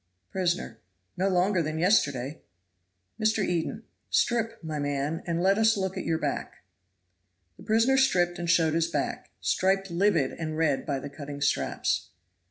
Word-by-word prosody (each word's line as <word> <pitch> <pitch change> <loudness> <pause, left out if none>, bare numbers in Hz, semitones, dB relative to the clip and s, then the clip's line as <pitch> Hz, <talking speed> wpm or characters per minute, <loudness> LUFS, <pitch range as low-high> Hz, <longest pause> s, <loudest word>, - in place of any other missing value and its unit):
Prisoner. 175 -11 -1 0.4
"No 190 +2 +1
longer 185 0 +2
than 155 0 -3
yesterday." 150 - +1 0.8
Mr. 215 -2 +2
Eden. 170 -2 -2 0.3
"Strip, 230 -1 +1
my 155 -2 -4
man, 145 +2 -2
and 170 0 0
let 195 +3 +3
us 220 -1 +4
look 190 -1 -2
at - - -4
your 165 -1 +1
back." - - -4 0.9
The - - -15
prisoner 230 +5 +3
stripped 175 -10 +2
and 170 -1 -3
showed 160 -2 +4
his 165 0 +2
back, 170 - -3
striped 195 0 +1
livid 170 -6 +2
and 155 -1 -5
red 155 -4 +1
by 140 -2 0
the 145 +2 -6
cutting 145 -1 -7
straps. - - 0
170 Hz, 155 wpm, -27 LUFS, 155-195 Hz, 0.9 s, us